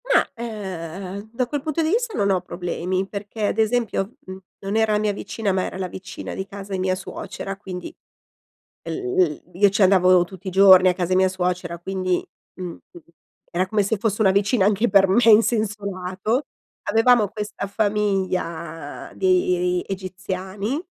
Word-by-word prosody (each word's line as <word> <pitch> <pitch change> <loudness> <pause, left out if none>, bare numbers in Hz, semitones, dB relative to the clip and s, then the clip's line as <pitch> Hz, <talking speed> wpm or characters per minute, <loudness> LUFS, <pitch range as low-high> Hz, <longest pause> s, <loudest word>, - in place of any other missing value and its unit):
Ma, - - +3
ehm, 195 -3 -6
da 250 +2 0
quel 290 +2 -3
punto 310 +2 -1
di 315 - +1
vista 455 +3 0
non 200 0 +2
ho 185 -2 +1
problemi, 180 +1 -3
perché 205 +1 -4
ad - - -2
esempio, 220 -2 0
mhmm, 185 0 -7 0.2
non 195 +2 -4
era 220 -1 +3
la - - +3
mia 210 -1 0
vicina, 205 +1 -3
ma 185 0 +1
era - - -5
la 190 -1 -2
vicina 185 +1 -8
di 190 - -4
casa 200 0 -8
di 190 - -1
mia 185 0 +1
suocera, 195 +1 -6
quindi 185 -2 -7 0.9
l - - -5
l 375 -1 0
io 200 +3 +5
ci 200 +1 +1
andavo 185 -1 +5
tutti 190 +2 -9
i - - -2
giorni 190 -1 +7
a - - +4
casa 180 -1 -2
di 185 - +3
mia 190 0 +4
suocera, 180 -2 -2
quindi, 185 0 -1 0.4
mhmm, 175 -2 -5 0.7
era 180 +2 0
come 210 +2 +1
se 200 +3 0
fosse 210 +1 -1
una 195 - +5
vicina 200 +2 +2
anche 210 +3 +2
per 195 -3 +5
me 210 +6 +4
in 225 -1 +8
senso 215 -3 -1
lato. 195 +7 -2 0.4
Avevamo 225 +1 +4
questa 210 0 -5
famiglia 185 -7 -2
di 180 -1 +2
egiziani 190 - -4
195 Hz, 175 wpm, -23 LUFS, 185-215 Hz, 0.9 s, in